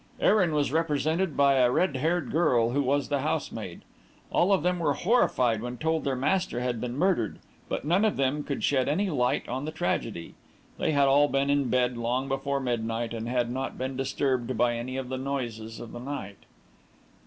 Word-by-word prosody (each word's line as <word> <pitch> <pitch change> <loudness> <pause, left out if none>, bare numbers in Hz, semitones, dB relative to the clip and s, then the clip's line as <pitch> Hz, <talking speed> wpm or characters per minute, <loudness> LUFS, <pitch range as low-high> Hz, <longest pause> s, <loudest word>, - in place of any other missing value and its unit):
Erin 185 -6 +3
was 145 -3 +1
represented 160 +1 0
by 140 -1 +4
a 125 -1 +5
red 140 +1 +1
haired 160 0 0
girl 125 -8 +2
who 140 +3 +1
was 140 +1 0
the 145 -1 +1
housemaid. - - -3 0.5
All 180 +4 +3
of 190 -6 +3
them 180 0 +1
were 150 -4 +1
horrified 125 - +2
when 125 +1 -5
told 160 +4 0
their 135 -1 0
master 175 +1 0
had 125 -2 -2
been 125 0 -3
murdered, 165 - +1 0.3
but - - -3
none 175 +7 +3
of 220 - +1
them 140 +2 0
could 140 - -4
shed 135 -1 +2
any 190 +6 0
light 125 -4 0
on 130 +3 -3
the 155 - -3
tragedy. 115 - -3 0.5
They - - +1
had 140 -1 +4
all 145 +2 +5
been 140 0 +1
in 140 -3 +1
bed 125 0 +1
long 125 +3 -1
before 140 +1 -1
midnight, 115 -2 -2
and 115 0 -4
had 120 -1 0
not 130 +1 -4
been 130 +1 -3
disturbed 135 -2 -1
by 120 -1 +2
any 125 +3 -4
of 130 -1 -4
the 130 0 -3
noises 120 -5 -4
of 115 - -8
the 120 - -7
night. 120 -7 -7
135 Hz, 200 wpm, -27 LUFS, 125-150 Hz, 0.5 s, a